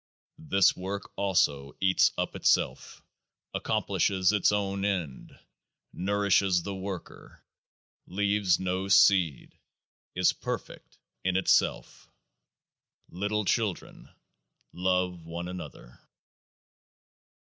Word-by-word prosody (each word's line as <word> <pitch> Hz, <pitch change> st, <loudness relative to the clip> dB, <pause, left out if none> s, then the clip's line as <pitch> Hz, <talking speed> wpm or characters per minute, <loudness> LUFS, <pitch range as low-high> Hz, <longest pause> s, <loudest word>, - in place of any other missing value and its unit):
This 95 Hz, +4 st, +3 dB
Work 95 Hz, +2 st, -6 dB
also 75 Hz, -8 st, 0 dB
eats 95 Hz, -1 st, +3 dB
up -, -, -2 dB
itself, -, -, 0 dB, 0.5 s
accomplishes 95 Hz, -1 st, +1 dB
its 105 Hz, -1 st, +2 dB
own 100 Hz, -1 st, -1 dB
end, 90 Hz, -10 st, -3 dB, 0.6 s
nourishes 100 Hz, -2 st, +1 dB
the 100 Hz, -, -5 dB
worker, 95 Hz, -1 st, -8 dB, 0.6 s
leaves 100 Hz, -2 st, +1 dB
no 95 Hz, +1 st, -2 dB
seed, 95 Hz, -6 st, +3 dB, 0.6 s
is 90 Hz, 0 st, +3 dB
perfect -, -, -7 dB, 0.3 s
in 95 Hz, 0 st, +1 dB
itself. 80 Hz, -9 st, 0 dB, 1.0 s
Little 105 Hz, +3 st, -2 dB
children, 105 Hz, -3 st, -2 dB, 0.6 s
love 90 Hz, -1 st, -1 dB
one 85 Hz, +2 st, -6 dB
another 90 Hz, -8 st, -9 dB
95 Hz, 85 wpm, -28 LUFS, 90-100 Hz, 1.0 s, This